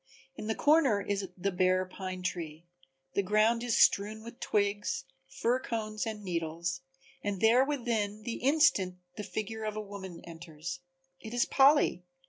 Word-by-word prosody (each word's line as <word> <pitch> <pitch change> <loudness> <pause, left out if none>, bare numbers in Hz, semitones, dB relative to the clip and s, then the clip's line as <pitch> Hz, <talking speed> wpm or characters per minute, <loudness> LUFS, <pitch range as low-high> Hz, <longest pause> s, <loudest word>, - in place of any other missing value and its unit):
In 215 - -6
the 220 - 0
corner 290 -8 +4
is 200 -1 -2
the 195 +2 -1
bare 185 0 +2
pine 185 0 -6
tree, 165 -2 -4 0.5
the - - +2
ground 215 +4 +3
is 240 -2 0
strewn 215 +2 +3
with 235 +1 -10
twigs, 205 -8 0 0.2
fir 235 - 0
cones 215 -3 -3
and 215 -2 -5
needles, 170 +1 -3 0.4
and 205 -2 -2
there 230 +5 +5
within 230 -7 -2
the 235 0 -3
instant 255 -10 +3 0.2
the 210 - -5
figure 220 +1 -4
of 215 -1 -3
a - - -3
woman 195 -4 -8
enters. 170 +1 -7 0.4
It 220 +2 -7
is 240 - +3
Polly! 275 - +4
205 Hz, 155 wpm, -31 LUFS, 185-230 Hz, 0.5 s, there